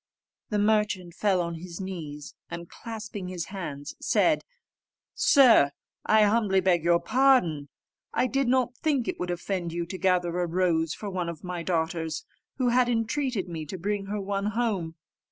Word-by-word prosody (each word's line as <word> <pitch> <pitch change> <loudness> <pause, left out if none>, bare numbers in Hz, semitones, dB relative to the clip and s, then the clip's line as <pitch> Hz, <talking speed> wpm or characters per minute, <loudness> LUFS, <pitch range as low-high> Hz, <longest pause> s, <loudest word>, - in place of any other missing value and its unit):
The 210 - 0
merchant 205 -4 +1
fell 195 -2 +1
on 170 0 -3
his 170 +2 -8
knees, 155 -6 -6 0.2
and 170 0 -6
clasping 220 -4 -7
his 180 -2 -4
hands, 150 -6 -5
said, - - +2 0.7
"Sir, 250 - +6 0.4
I 215 0 +6
humbly 205 -2 +3
beg 180 -3 +2
your 170 0 +4
pardon: 220 - +3 0.4
I - - +1
did 270 +1 0
not 250 -1 +2
think 275 -3 0
it - - -3
would 180 - -3
offend 175 -1 -3
you 170 0 -2
to 185 +2 -7
gather 180 -1 +1
a 175 - 0
rose 165 -2 +1
for 205 -2 -6
one 180 -2 -2
of 165 -3 -8
my 180 -1 -4
daughters, 160 -2 -2 0.3
who 255 -2 +2
had 245 0 +3
entreated 235 -2 -1
me 165 -3 -5
to 190 - -5
bring 200 +2 -2
her 210 +1 -2
one 200 0 -2
home. 205 -7 -1
185 Hz, 170 wpm, -27 LUFS, 170-220 Hz, 0.7 s, Sir